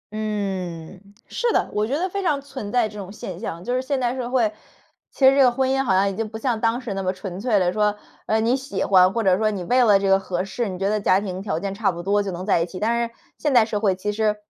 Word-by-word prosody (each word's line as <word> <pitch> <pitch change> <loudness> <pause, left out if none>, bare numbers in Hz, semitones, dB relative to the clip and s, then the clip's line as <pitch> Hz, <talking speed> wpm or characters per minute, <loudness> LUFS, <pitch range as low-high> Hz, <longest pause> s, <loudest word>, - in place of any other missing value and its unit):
嗯， 190 -5 -4 0.3
是 480 -1 -1
的， - - +1
我 210 +1 0
觉 280 +4 -1
得 370 +3 0
非 395 +2 -4
常 300 -6 +1
存 265 -7 -7
在 245 -3 +2
这 210 0 -10
种 195 0 -7
现 185 -4 -7
象。 170 -5 -6
就 245 +4 -2
是 255 - +1
现 270 0 -2
代 245 0 0
社 245 -2 -4
会， 235 -5 +1 0.6
其 265 - +3
实 270 - +6
这 280 - +5
个 250 - +6
婚 260 +2 0
姻 270 0 +1
好 210 - 0
像 195 +1 +3
已 195 - -2
经 220 +1 -3
不 220 - -7
像 230 -1 -1
当 230 +2 +1
时 235 -6 -5
那 195 - -3
么 185 -1 0
纯 185 -1 -7
粹 215 -1 +1
的 180 -1 +1
说， 210 -1 +1 0.3
呃， 220 - +2
你 230 +3 +2
喜 275 +1 -3
欢， 185 -1 +5
或 230 +1 -1
者 185 -2 +4
说 215 -1 +2
你 195 -4 -4
为 250 +7 +3
了 205 -3 +6
这 195 0 -1
个 195 0 +5
合 185 -1 -3
适， 215 +2 -3
你 185 - -5
觉 195 +2 -1
得 210 0 0
家 190 -1 +3
庭 190 -2 -5
条 165 -6 -2
件 195 0 -4
差 205 -1 0
不 175 0 -7
多 205 +2 +2
就 200 - -3
能 180 +1 -5
在 185 -5 +2
一 - - +1
起。 185 - -8
但 235 +2 0
是 230 - -27 0.2
现 295 - 0
代 230 - +6
社 215 -2 -2
会 195 -4 +2
其 210 +2 -3
实 215 0 +1
210 Hz, 320 characters per minute, -23 LUFS, 195-240 Hz, 0.6 s, 实